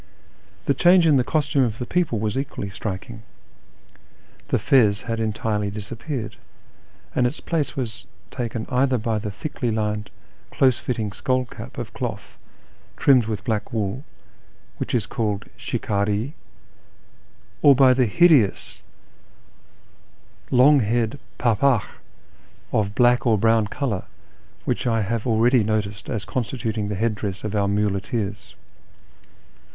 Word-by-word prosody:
The 140 - +3
change 175 +5 +5
in 150 -4 +5
the 125 - +3
costume 145 0 +1
of 115 -3 -1
the 125 - -4
people 170 -6 0
was 105 0 -2
equally 135 -7 -4
striking: 105 +3 -6 1.3
the - - +1
fez 115 -8 +3
had 115 -1 -3
entirely 110 -1 -1
disappeared, 110 +5 -5 0.8
and 125 - +3
its 135 - -5
place 160 -5 -2
was 115 -3 -4 0.2
taken 115 -3 -4
either 130 0 +2
by 110 -1 -1
the 105 0 -4
thickly 125 +3 -4
lined, 105 -1 -2 0.4
close 130 -3 +2
fitting 110 -5 -3
skull 130 +5 0
cap - - -10
of - - -6
cloth - - -5 0.6
trimmed 130 -5 +5
with 110 -3 -3
black 110 -4 -2
wool, 110 +3 -2 0.7
which - - -2
is - - +1
called 105 -3 -2
" - - -30
shikciH" 110 0 -1 1.3
or 140 -1 +7
by 130 -1 +6
the 125 -1 +2
hideous 145 - +3 1.7
long 135 +3 +6
haired 115 +3 0 0.2
pdpdkh 120 0 +2 0.9
of 105 -1 0
black 125 0 +4
or 110 -2 +4
brown 110 0 +3
colour 110 -5 -3 0.6
which - - -1
I 115 -2 +1
have 115 +3 -2
already 120 +1 +4
noticed 105 -1 -2
as 110 -6 -3
constituting 115 -3 -2
the 105 - -2
head 115 +3 0
dress 100 -2 -5
of 105 0 -3
our 100 -1 +2
muleteers. 100 +1 -2
115 Hz, 135 wpm, -23 LUFS, 105-130 Hz, 1.7 s, or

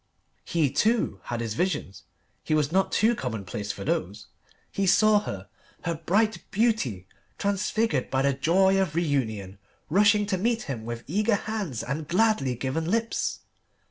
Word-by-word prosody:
He, 155 -6 +1
too, 215 - +1
had 120 -1 -3
his 115 -2 -3
visions: 145 - -2 0.4
he 155 - +1
was 150 -1 +1
not 190 +2 +2
too 225 +3 +3
commonplace 105 - -4
for 100 - -7
those. 100 +2 -2 0.4
He 195 -1 -1
saw 215 +3 +5
her, 100 - -6 0.4
her 170 - -1
bright 200 +7 +1
beauty 200 - 0 0.3
transfigured 205 +3 0
by 130 0 +1
the 140 0 +3
joy 190 +7 +3
of 170 -5 -2
reunion, 110 - -1 0.3
rushing 205 +3 +4
to 195 -2 -1
meet 230 +2 0
him 120 -6 -5
with 120 0 -5
eager 210 +6 +1
hands 200 - -3
and 140 +5 -4
gladly 180 - +2
given 135 +7 -2
lips. 230 +3 -1
165 Hz, 150 wpm, -26 LUFS, -, 0.4 s, saw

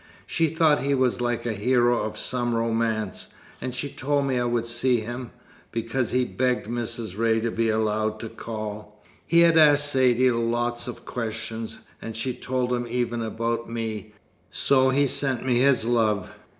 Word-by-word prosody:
She 165 - +1
thought 160 -1 +3
he 140 +1 +1
was 130 -2 +1
like 120 -1 -1
the 120 - -1
hero 120 +3 +2
of 110 - -4
some 120 -2 -1
romance; 115 -3 -1 0.3
and 125 - -4
she 145 - -2
told 140 +1 -1
me 130 -2 0
I 120 - 0
would 120 -1 0
see 120 0 +2
him, 120 +2 -6 0.4
because 115 +1 -1
he'd 125 -1 -1
begged 125 -3 +1
Mrs. 115 -3 -4
Ray 115 -1 +3
to 115 0 -1
be 115 0 0
allowed 110 0 0
to 115 - -5
call. 105 -2 -7 0.3
He 170 0 +5
had 165 -1 +6
asked 145 -1 +5
Saidee 130 -1 +4
lots 120 +1 -1
of 125 - -8
questions, 115 -1 -5 0.2
and 115 -1 -6
she'd 120 +2 -3
told 125 -1 -1
him 120 -1 -1
even 120 -1 -1
about 115 +1 -2
me 110 -2 -5 0.4
so 130 -1 +3
he 140 +2 +3
sent 130 -2 0
me 125 -2 +2
his 130 -3 +3
love. 110 -5 +1
120 Hz, 175 wpm, -25 LUFS, 115-130 Hz, 0.4 s, had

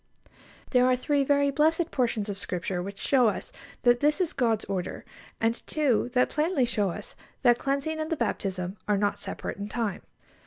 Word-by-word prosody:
There 250 -1 +5
are 255 - +4
three 280 +3 +1
very 280 0 +3
blessed 320 +4 +2
portions 230 -5 0
of 205 - -3
Scripture 180 -1 -3
which 195 +2 -6
show 255 -4 +4
us 210 - -2 0.3
that 240 0 +5
this 295 +4 +2
is 360 -4 0
God's 225 -4 +1
order, 190 -2 -4 0.3
and 225 +1 0
two 265 -6 +1
that 250 0 +4
plainly 305 -3 +1
show 210 -5 0
us - - -7 0.3
that 240 -1 +5
cleansing 280 +3 -1
and 310 0 -2
the 325 - -1
baptism 185 -4 -2
are 210 -1 +3
not 205 0 0
separate - - -5
in 205 +1 -5
time. 220 -4 -2
245 Hz, 185 wpm, -27 LUFS, 205-285 Hz, 0.3 s, There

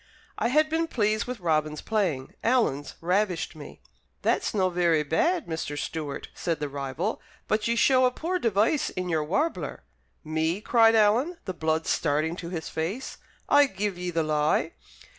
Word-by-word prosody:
I - - +2
had 305 +5 +3
been 325 +1 0
pleased 215 -5 0
with 250 -2 -5
Robin's 155 -3 0
playing, 180 -12 -1
Alan's 225 - +1
ravished 180 -1 0
me. 150 -2 -11 0.4
"That's - - +1
no 185 -3 +1
very 170 -3 +2
bad, 325 - +1
Mr. 160 -3 -4
Stewart," 150 -2 -4
said 165 -2 -2
the 150 - -2
rival, 140 +8 -3 0.3
"but 215 +1 +1
ye 235 - +1
show 255 +1 +5
a - - 0
poor 355 +7 -2
device 225 - +2
in 180 0 -4
your 160 -2 +1
warbler." 285 - -2 0.4
"Me!" 160 +3 -1
cried 225 0 +4
Alan, 230 +11 +3
the 185 - -3
blood 160 -1 -1
starting 155 +2 0
to 170 - -6
his 170 -3 -4
face. 185 +12 -4 0.3
"I 290 0 +6
give 200 -3 -3
ye 180 0 -4
the 165 -2 0
lie." 150 -1 +1
180 Hz, 165 wpm, -27 LUFS, 160-230 Hz, 0.4 s, I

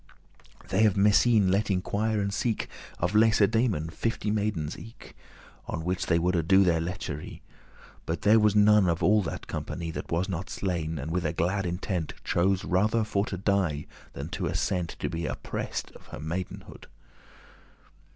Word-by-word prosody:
They 110 +3 +4
of 100 - +1
Messene 105 0 +4
let 100 +3 +1
inquire 105 +3 0
and 100 0 -2
seek 110 +2 -1 0.3
Of 90 +3 -1
Lacedaemon 110 -5 +3
fifty 115 +2 -2
maidens 100 -8 -1
eke, 115 +1 -13 0.5
On 80 - -4
which 90 +1 -1
they 85 - +3
woulde 85 -1 +1
do 95 +1 +6
their 85 -3 +2
lechery: 85 -4 -5 0.6
But 80 - -3
there 110 +2 +6
was 105 -1 +3
none 105 -2 +5
of 85 0 -1
all 105 +1 +5
that 90 - -5
company 85 -1 -5
That - - -7
was 85 +3 0
not 95 -1 -4
slain, 85 -4 -2
and 75 +3 -4
with 90 +1 0
a 80 -1 -1
glad 95 +3 0
intent 90 -1 -3
Chose 95 +2 +1
rather 105 +5 +2
for 105 -1 -1
to 95 - -4
die, 95 -6 0 0.3
than - - -6
to - - -3
assent 90 -3 -1
To - - 0
be 85 0 -3
oppressed* - - -4
of - - -16
her - - -8
maidenhead. 85 +4 -6
95 Hz, 165 wpm, -27 LUFS, 85-105 Hz, 0.6 s, do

